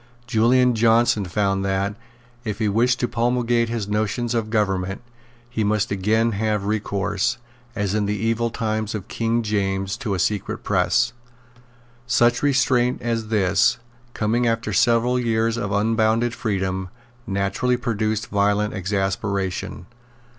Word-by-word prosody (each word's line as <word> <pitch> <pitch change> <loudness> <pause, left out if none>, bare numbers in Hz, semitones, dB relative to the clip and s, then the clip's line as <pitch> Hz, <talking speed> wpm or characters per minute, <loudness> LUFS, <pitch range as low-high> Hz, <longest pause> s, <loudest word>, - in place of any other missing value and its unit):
Julian 125 +1 +3
Johnson 115 -2 +3
found 95 +1 0
that, 95 +1 0 0.5
if 105 -4 -3
he 110 -1 0
wished 120 +5 +2
to 120 - +1
promulgate 120 0 +1
his 115 -3 -3
notions 110 +3 -1
of 115 -2 -1
government, 95 -3 -1 0.5
he 120 -2 -2
must 105 -1 0
again 110 +4 +1
have 105 -1 -1
recourse, 105 +1 -1 0.4
as 100 -3 -1
in 105 -1 0
the 105 +1 -1
evil 115 +2 0
times 110 -2 -2
of 100 -1 -6
King 115 0 -1
James, 95 -2 -1
to 110 -8 -2
a - - -2
secret 105 +2 -1
press. 100 +5 +2 0.9
Such 120 -1 +3
restraint 130 -3 +2
as 115 -2 -1
this, 100 -2 +2 0.4
coming 115 +3 +1
after 115 -2 -1
several 120 +5 +3
years 115 -1 +1
of 105 -4 -3
unbounded 110 +3 +2
freedom, 95 -5 -2 0.4
naturally 100 +6 0
produced 110 -2 -1
violent 105 +1 +1
exasperation. 95 -1 -2
110 Hz, 130 wpm, -22 LUFS, 100-115 Hz, 0.9 s, Julian